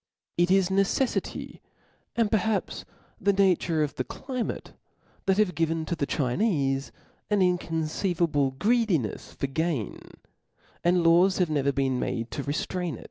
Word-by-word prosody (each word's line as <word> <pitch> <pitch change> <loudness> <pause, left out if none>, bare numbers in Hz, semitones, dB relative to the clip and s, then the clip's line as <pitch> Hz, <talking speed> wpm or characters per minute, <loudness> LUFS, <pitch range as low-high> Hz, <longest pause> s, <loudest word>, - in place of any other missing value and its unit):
Jt 175 +1 +4
is 190 -1 +4
necel&ty, 195 +7 -1 0.5
and 230 -3 +1
perhaps 220 -2 0 0.3
the 200 - +3
nature 180 -5 +2
of 145 - -2
the - - 0
climate, 255 -4 -5 0.5
that 190 0 +3
has 210 -3 +3
given 165 0 -1
to 170 - -2
the 140 -3 -2
Chine(e 135 - 0 0.4
an 205 -2 +2
inconceivable 165 -4 0
greedinefs 200 - 0
for - - -2
gain, 145 -3 -2 0.8
and 175 0 +3
laws 175 +3 +5
have 180 -4 +1
never 140 -2 +2
been 135 -2 0
made 115 -1 -3
to 145 - -3
reftrain 165 +3 -2
it. - - -11
170 Hz, 135 wpm, -27 LUFS, 145-195 Hz, 0.8 s, laws